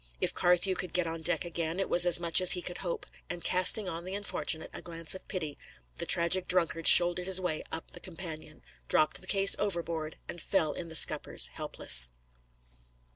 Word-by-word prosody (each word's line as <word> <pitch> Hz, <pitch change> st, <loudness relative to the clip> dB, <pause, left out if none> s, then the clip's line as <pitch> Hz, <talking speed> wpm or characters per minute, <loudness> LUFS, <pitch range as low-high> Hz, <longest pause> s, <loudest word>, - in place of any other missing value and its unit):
If -, -, -2 dB
Carthew 180 Hz, +2 st, +1 dB
could 180 Hz, -2 st, -5 dB
get 180 Hz, -1 st, 0 dB
on 165 Hz, 0 st, -6 dB
deck 175 Hz, +2 st, 0 dB
again, 170 Hz, +1 st, -5 dB
it 195 Hz, -, -2 dB
was 175 Hz, 0 st, +2 dB
as 175 Hz, -, +4 dB
much 170 Hz, 0 st, +3 dB
as 185 Hz, -, +5 dB
he 180 Hz, -, -4 dB
could 180 Hz, -, -8 dB
hope; 175 Hz, -3 st, -5 dB, 0.2 s
and 175 Hz, -1 st, -7 dB
casting 185 Hz, +3 st, +2 dB
on 170 Hz, -1 st, -6 dB
the 185 Hz, +2 st, -7 dB
unfortunate 185 Hz, -5 st, -4 dB
a -, -, -9 dB
glance 165 Hz, -1 st, -7 dB
of 190 Hz, -, -12 dB
pity, 155 Hz, -7 st, -6 dB, 0.4 s
the -, -, -5 dB
tragic 175 Hz, +2 st, +1 dB
drunkard 165 Hz, -2 st, 0 dB
shouldered 175 Hz, +1 st, +8 dB
his 190 Hz, -1 st, 0 dB
way 180 Hz, -4 st, -4 dB
up 160 Hz, -, -8 dB
the -, -, -12 dB
companion, 160 Hz, -4 st, -10 dB, 0.2 s
dropped 155 Hz, -, 0 dB
the 185 Hz, -, -15 dB
case 195 Hz, 0 st, +4 dB
overboard, 170 Hz, -5 st, -4 dB
and 175 Hz, -, -8 dB
fell 160 Hz, -6 st, -1 dB
in 170 Hz, +2 st, -8 dB
the 160 Hz, -, -9 dB
scuppers -, -, +3 dB
helpless. -, -, 0 dB
175 Hz, 195 wpm, -29 LUFS, 165-185 Hz, 0.4 s, shouldered